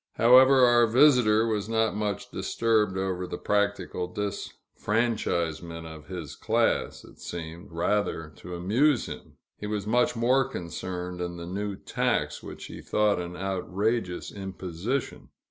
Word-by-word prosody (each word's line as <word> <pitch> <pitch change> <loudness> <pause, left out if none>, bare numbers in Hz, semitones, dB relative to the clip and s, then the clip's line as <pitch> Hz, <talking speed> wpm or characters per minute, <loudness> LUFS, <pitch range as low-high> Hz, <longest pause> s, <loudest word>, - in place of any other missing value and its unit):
However, 130 +3 +7
our 120 -1 +5
visitor 120 -3 +5
was 110 -2 -1
not 110 -1 +1
much 105 -1 -3
disturbed 110 -4 +1
over 95 -1 -2
the - - -5
practical 100 -3 -1
disfranchisement 90 -5 -2
of 80 -2 -10
his 90 -6 -6
class - - 0
it - - -16
seemed, 85 +2 -7
rather, 85 -2 -1
to 90 0 -8
amuse 120 - +2
him; - - -9 0.2
he 105 - -5
was 105 -2 -2
much 120 +3 +2
more 125 +4 +3
concerned 90 -2 -5
in 85 0 -4
the 85 - -7
new 100 +3 -3
tax, - - -1
which - - -9
he - - -9
thought 105 -3 +1
an 90 0 -6
outrageous 95 +1 -2
imposition. 95 +5 -4
100 Hz, 135 wpm, -27 LUFS, 90-115 Hz, 0.2 s, However